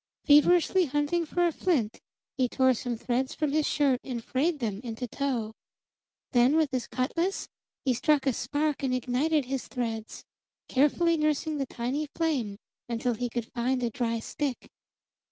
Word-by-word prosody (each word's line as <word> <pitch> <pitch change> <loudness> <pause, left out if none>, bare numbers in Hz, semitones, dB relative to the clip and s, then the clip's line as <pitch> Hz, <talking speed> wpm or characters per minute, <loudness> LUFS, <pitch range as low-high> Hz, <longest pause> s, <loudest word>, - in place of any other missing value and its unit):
Feverishly 350 +5 +5
hunting 295 +4 0
for 350 +3 +1
a 340 - +2
flint, 280 - 0 0.4
he 255 -3 +1
tore 260 0 +3
some 240 0 -3
threads 255 +3 -1
from 305 -2 0
his 305 0 +2
shirt 275 -4 +2
and 240 -4 -5
frayed 300 +8 0
them 215 -6 -3
into 240 +1 -4
tow. 240 -4 -2 0.8
Then 250 +3 +4
with 315 -3 +2
his 255 -3 -2
cutlas 335 +9 -1 0.4
he 260 - +3
struck 285 +3 +2
a 265 - +2
spark 290 +5 -1
and 260 -2 0
ignited 265 +4 +1
his 265 0 -3
threads, 225 -3 -4 0.4
carefully 325 +5 +3
nursing 305 0 0
the 275 - -1
tiny 260 +7 -2
flame 265 -12 -1 0.3
until 240 +1 0
he 245 +2 -3
could 235 -1 -4
find 250 +1 0
a 235 - 0
dry 230 0 -1
stick. 270 +3 -4
265 Hz, 160 wpm, -28 LUFS, 240-300 Hz, 0.8 s, Feverishly